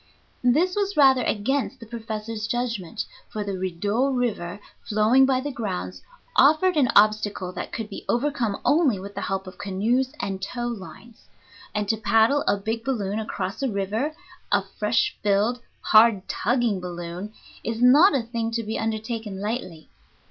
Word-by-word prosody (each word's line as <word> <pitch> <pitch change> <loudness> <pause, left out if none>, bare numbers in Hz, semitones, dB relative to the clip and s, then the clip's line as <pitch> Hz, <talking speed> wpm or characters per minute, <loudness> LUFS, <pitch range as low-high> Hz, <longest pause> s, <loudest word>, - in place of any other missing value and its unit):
This 315 +10 +3
was 405 -2 -1
rather 265 -3 +6
against 250 +5 -1
the 230 - -10
professor's 220 -1 -5
judgment, 230 -4 -3 0.2
for 215 - -4
the 200 -1 -3
Rideau 200 +8 0
River, 215 -8 -2 0.2
flowing 220 +5 +4
by 260 -1 +2
the 290 +2 -4
grounds, 90 - -4 0.3
offered 315 +6 +5
an 275 -5 +3
obstacle 205 -3 +3
that - - -6
could 225 -2 -4
be 205 - -8
overcome 240 -5 0
only 290 - +3
with 200 +2 -8
the - - -5
help 195 0 -2
of 185 +1 -11
canoes 225 +7 0
and 195 -1 -3
tow 240 +5 -4
lines; 230 +1 -8 0.5
and 210 -1 -1
to 220 +2 +1
paddle 225 +6 +3
a - - +3
big 220 +3 -3
balloon 215 -6 -1
across 200 -2 -4
a 270 - +1
river, 215 +9 -2 0.4
a - - +3
fresh 215 +2 0
filled, 210 +4 +2 0.2
hard 215 -3 +5
tugging 235 -3 0
balloon, 175 +2 -6 0.3
is 230 0 -3
not 280 +10 +6
a 255 - +1
thing 230 0 -3
to 230 0 -2
be 220 +1 -3
undertaken 220 -2 -3
lightly. 200 -6 -4
220 Hz, 160 wpm, -24 LUFS, 200-245 Hz, 0.5 s, rather